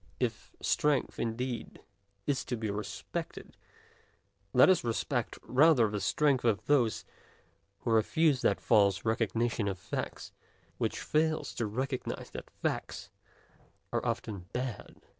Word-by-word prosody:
If - - -3
strength 150 -3 +1
indeed 120 +2 -3 0.5
is 140 -2 0
to 125 - -2
be 110 -2 -2
respected, 105 0 -5 1.0
let 125 - +7
us 185 -2 +4
respect 115 -2 -1
rather 130 -3 +5
the 105 -1 -2
strength 145 -4 +2
of 110 -5 +1
those 125 -7 +2 0.8
who 115 - -1
refuse 135 +6 +3
that - - +2
false 100 -3 +3
"recognition 115 0 0
of 95 -1 -2
facts" - - -5 0.5
which - - -1
fails 155 0 0
to 115 - -2
recognize 130 +5 -3
that - - -8
facts - - -4 0.8
are - - 0
often 100 -5 -3
bad. 125 -3 -5
120 Hz, 120 wpm, -31 LUFS, 110-135 Hz, 1.0 s, let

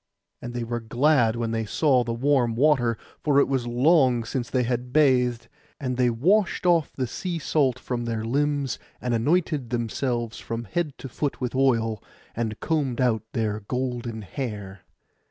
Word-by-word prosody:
And 120 0 -7
they 120 - -2
were 120 +1 -3
glad 120 0 +2
when 115 -1 -2
they 115 0 -1
saw 130 +3 +2
the 115 - -3
warm 120 -1 +2
water, 125 -4 +3 0.3
for 145 -2 +3
it - - +4
was 130 -3 -1
long 125 -1 +3
since 120 +1 -3
they 130 -1 +1
had 125 +1 -2
bathed. 125 -5 +3 0.3
And 130 -2 -2
they 125 -1 +3
washed 185 - +2
off 170 -3 +3
the 130 - -2
sea 170 +8 -4
salt 140 -5 +1
from 120 -2 -4
their 115 -1 -2
limbs, 140 0 0 0.2
and 125 -1 -2
anointed 145 +1 +1
themselves 120 0 -2
from 115 +1 -4
head 145 - -3
to - - -7
foot 140 +3 -3
with 125 -2 -3
oil, 115 -5 +1 0.3
and 110 -2 -3
combed 145 -7 -1
out 120 -4 +2
their 110 -2 -1
golden 120 0 -3
hair. 105 -4 -5
125 Hz, 170 wpm, -25 LUFS, 115-140 Hz, 0.3 s, it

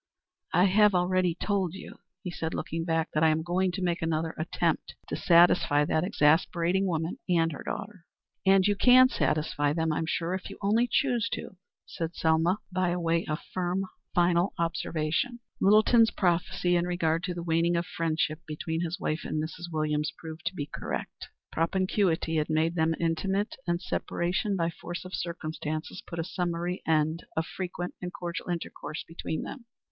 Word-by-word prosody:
"I 175 - +6
have 205 +1 +5
already 180 -1 +2
told 190 -3 -1
you," - - -10 0.2
he 180 - -4
said, 160 -1 -3
looking 165 0 -3
back, 165 -1 0
"that 155 - +1
I 160 - +6
am 155 +1 +1
going 180 +2 +1
to 185 +1 -3
make 175 -1 0
another 160 0 -1
attempt 155 +2 -1
to - - -2
satisfy 170 -4 +5
that 155 +2 +1
exasperating 175 +2 +2
woman 165 -1 -2
and 165 -2 +3
her 145 - -7
daughter." 200 -3 -6 0.4
"And 195 -1 +5
you 205 0 +3
can 255 +4 +7
satisfy 150 - 0
them, 160 0 0
I'm 160 +1 -1
sure, 165 +2 -1
if 190 +1 -4
you 200 - -9
only 220 +4 +2
choose 245 -5 +2
to," - - -5 0.3
said 165 0 -5
Selma, 165 +4 +2
by 180 -1 +1
way 170 -1 +1
of 155 - -1
a - - -16
firm, 185 +1 0 0.3
final 175 +1 +3
observation. 165 +6 -1 0.2
Littleton's 215 +3 +5
prophecy 175 -1 +1
in 175 0 +1
regard 165 -2 +1
to 180 -2 -3
the 170 - -4
waning 170 +1 +2
of 170 +1 0
friendship 155 -2 -1
between 160 +2 -3
his 175 +3 -3
wife 155 -2 -1
and 155 - -2
Mrs. 165 +2 -5
Williams 150 -1 0
proved 160 0 -7
to - - -2
be 145 - -3
correct. - - -6 0.2
Propinquity 170 -1 +1
had 155 0 0
made 160 +1 +2
them 160 -1 +1
intimate, 190 +5 0
and 170 0 +1
separation 180 +2 -1
by 170 -2 0
force 175 +2 -7
of 185 - -9
circumstances 155 -1 -4
put 170 - -7
a 165 - 0
summary 175 0 -2
end 160 +1 +1
to 160 - +2
frequent 180 0 -5
and 180 -1 -4
cordial 175 0 -5
intercourse 170 -2 -4
between 160 -1 -4
them. 255 -4 -8
170 Hz, 175 wpm, -28 LUFS, 160-185 Hz, 0.4 s, can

